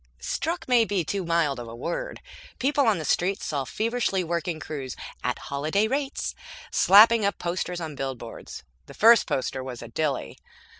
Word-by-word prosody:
Struck 330 - -3
may 245 -2 +5
be 200 -5 0
too 195 +4 -2
mild 165 -6 +1
a 115 -1 -7
word. 165 +8 -4 0.4
People 280 0 +2
on 220 - +3
the 155 - -4
streets 190 +6 0
saw 140 -3 -2
feverishly 220 - -1
working 170 -1 -2
crews 140 -6 -6 0.3
(at - - -1
holiday 155 +10 -1
rates!) 275 +3 -2 0.4
slapping 220 +3 +7
up 200 - 0
posters 175 0 -3
on 160 -3 -5
billboards. 130 -4 -7 0.2
The - - -12
first 230 +1 +6
poster 130 0 -2
was 125 -2 -7
a 120 - -9
dilly. 145 +1 -2
170 Hz, 160 wpm, -26 LUFS, 140-220 Hz, 0.4 s, slapping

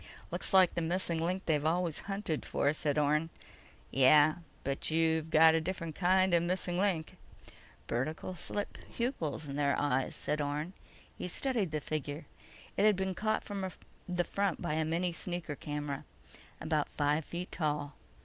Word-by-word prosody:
"Looks - - -1
like 190 -3 +6
the 170 - -1
missing 170 -1 0
link 185 +3 -1
they're 150 -3 +2
always 165 0 +1
hunting 195 -6 -2
for," 145 - +1
said 150 -2 0
Orne. 150 +2 +2 0.6
"Yeah, 145 +4 +6 0.3
but 135 0 -2
you've 160 0 +2
got 160 0 +7
a 160 - +2
different 165 -2 -4
kind 185 0 +3
of 170 - +5
a - - -2
missing 180 -1 -1
link." 185 -6 0 0.7
"Vertical 155 +9 -2
slit 205 +3 -5
pupils 175 - -2
in 140 0 -5
their 140 -1 +2
eyes," 135 -2 0
said 150 0 -1
Orne. 150 +5 -2 0.4
He - - -5
studied 225 -1 0
the 155 0 -1
figure. 150 +1 -4 0.5
It - - +3
had 215 -1 +6
been 190 0 -1
caught 215 +3 0
from 195 -2 -3 0.4
the 180 0 +1
front 200 +2 -1
by 170 -3 -2
a 160 0 +1
mini 170 +3 0
sneaker 175 -3 -3
camera. 145 -1 -4 0.6
About 155 -2 0
five 150 +2 +1
feet 175 +4 -6
tall. 150 -3 -1
160 Hz, 165 wpm, -32 LUFS, 150-185 Hz, 0.7 s, got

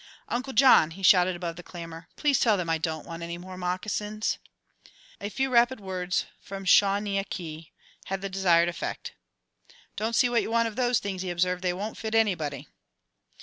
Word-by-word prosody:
"Uncle 255 +3 -2
John," 245 - +6
he 190 +4 -11
shouted 185 -1 +5
above 170 -2 -5
the - - -7
clamour, 165 -1 -9
"please 290 -3 +2
tell 220 -4 +3
them 170 -3 -2
I 165 - +1
don't 160 -1 -3
want 165 -1 -8
any 170 0 -5
more 185 +1 -9
moccasins!" 210 +4 -2 0.8
A 205 - -4
few 265 +4 -1
rapid 240 +1 +4
words 185 -2 -2 0.2
from 195 0 -8
Shaw 200 +1 +5
ne 205 -1 -1
aw - - -1
kee 160 -3 -7 0.3
had 195 0 -3
the 195 - -3
desired 180 -3 +3
effect. 175 - -5 0.8
"Don't 225 +2 -1
see 250 - +5
what 240 -1 +2
you - - -4
want 230 0 +2
of 220 - -6
those 245 -1 +2
things," 195 -2 -3
he 185 - -3
observed; 180 +1 0
"they 180 -1 +1
won't 205 +5 -5
fit 220 0 -3
anybody." 165 - 0
190 Hz, 190 wpm, -27 LUFS, 175-220 Hz, 0.8 s, John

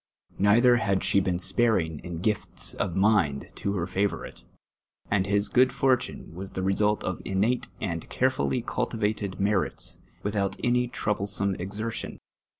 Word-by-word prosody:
Nrithrr 120 +5 +5
had 100 -4 +1
nhc 100 - +3
been 90 -2 0
sparini:: 95 -4 +1
in 85 0 -6
,u;it'ts 105 -2 0
of 95 -4 -2
mind 95 -9 +2
to 100 - -2
Iut 90 -3 -2
favourito: 95 +2 -2 0.7
and 100 -1 +2
his 100 +1 +2
j^ood 130 +1 +5
fjir 130 0 +3
tmio 125 -8 -8
was 95 +3 -8
the 95 - -3
result 105 +2 +2
of 95 - -2
iimate 105 +6 0
and 85 -6 -2
earefully 130 -1 +1
eidtivated 105 -5 -2
merits, 100 -11 -1 0.2
witliout 100 -1 -1
any 125 0 +2
troublesome 100 -3 -1
exertion. 105 +5 -4
100 Hz, 145 wpm, -27 LUFS, 95-110 Hz, 0.7 s, Nrithrr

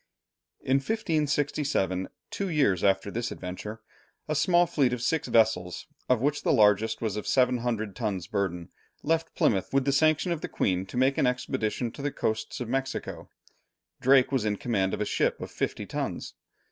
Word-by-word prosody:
In 135 +1 +2
1567, 145 - 0 0.2
two 200 -1 -2
years 135 - +2
after 95 0 +2
this 120 +2 -3
adventure, 105 +4 -7 0.5
a 155 - 0
small 175 +3 +4
fleet 135 -7 +1
of 125 - -3
six 155 +5 0
vessels, 100 -6 +2 0.2
of 125 -3 +3
which 145 +2 +1
the - - +1
largest 110 +1 +3
was 110 -3 -1
of 105 - -5
700 120 -5 +1
tons' 105 -7 -2
burden, 90 -3 -2 0.3
left 165 +1 0
Plymouth 95 -4 +1
with 135 -1 +2
the 140 - +2
sanction 155 +4 +3
of 165 -2 -2
the - - -4
Queen, 95 0 0
to 125 - -7
make 130 +2 +2
an 130 - +3
expedition 125 -2 -1
to - - -9
the 145 0 -1
Coasts 110 -3 -2
of 125 - -4
Mexico. 135 +2 -3 0.7
Drake 130 0 +4
was 135 -5 +1
in 105 -1 0
command 95 -4 0
of - - -6
a - - +1
ship - - 0
of - - -7
fifty - - -3
tons. - - -4
125 Hz, 175 wpm, -27 LUFS, 105-140 Hz, 0.7 s, small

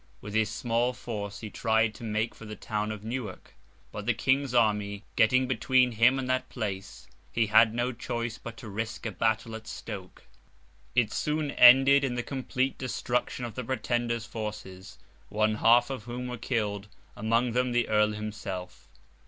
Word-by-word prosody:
With 105 - -9
his 110 0 +2
small 115 +2 0
force 100 -5 -6
he 110 -2 -7
tried 110 -1 +1
to 115 - -12
make 110 +1 -1
for 115 - -12
the 105 0 -7
town 105 0 -3
of 105 -1 -7
Newark; 115 -4 -6 0.4
but - - -7
the - - +2
King's 135 0 +1
army 105 -4 +1
getting 130 +3 +4
between 130 +1 +3
him 120 +4 +4
and 130 -1 -3
that 130 0 -1
place, 100 -5 -5 0.2
he 115 - +2
had 110 +1 +5
no 120 +1 0
choice 120 -1 -4
but 115 -1 -9
to 130 -5 -9
risk 110 +3 -5
a 110 - -2
battle 110 +3 0
at 110 0 -8
Stoke. 95 -2 -8 0.7
It 120 -4 +3
soon 150 -1 -1
ended 135 +3 +7
in 130 -3 -1
the 120 - -2
complete 130 0 -2
destruction 125 -1 -2
of 115 - -6
the 125 - -4
Pretender's 120 -2 -1
forces, 105 -4 -7 0.3
one 110 +1 +1
half 120 +4 +4
of 130 -6 -6
whom 120 +1 -5
were 125 - -4
killed; 105 -4 -2 0.3
among 115 +3 +1
them, 125 +1 +1
the 120 -1 +1
Earl 105 0 +3
himself. 105 -4 -6
115 Hz, 175 wpm, -28 LUFS, 105-125 Hz, 0.7 s, ended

